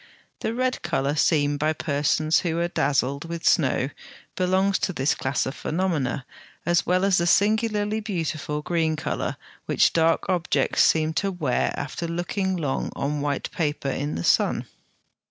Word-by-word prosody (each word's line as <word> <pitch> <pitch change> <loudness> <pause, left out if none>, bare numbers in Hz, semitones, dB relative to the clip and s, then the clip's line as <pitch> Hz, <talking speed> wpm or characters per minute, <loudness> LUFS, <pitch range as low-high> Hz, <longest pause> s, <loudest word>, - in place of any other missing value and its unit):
The 225 - -2
red 255 +1 0
colour 140 +2 0
seen 145 -1 +2
by 155 +2 +1
persons 155 +1 +1
who 165 -2 -2
are 170 0 +1
dazzled 140 -2 0
with 170 0 -6
snow 135 -2 +2 0.4
belongs 190 +2 +2
to 190 - -1
this 135 -1 +1
class 130 +1 -1
of 130 - -3
phenomena, 155 -7 -1 0.4
as 175 0 +2
well 185 +2 +2
as 195 -2 +3
the 170 - +1
singularly 215 +2 +2
beautiful 160 -7 -3
green 160 -2 0
colour 150 - -3 0.3
which - - +3
dark 165 0 +2
objects 180 -3 +1
seem 160 0 +3
to 200 -1 -1
wear 150 -9 0
after 160 +4 -4
looking 185 +3 -2
long 145 -5 -2
on 145 +1 -2
white 145 -1 -2
paper 145 -4 -1
in 145 +3 -3
the 85 - -3
sun. - - +2
160 Hz, 155 wpm, -24 LUFS, 145-185 Hz, 0.4 s, as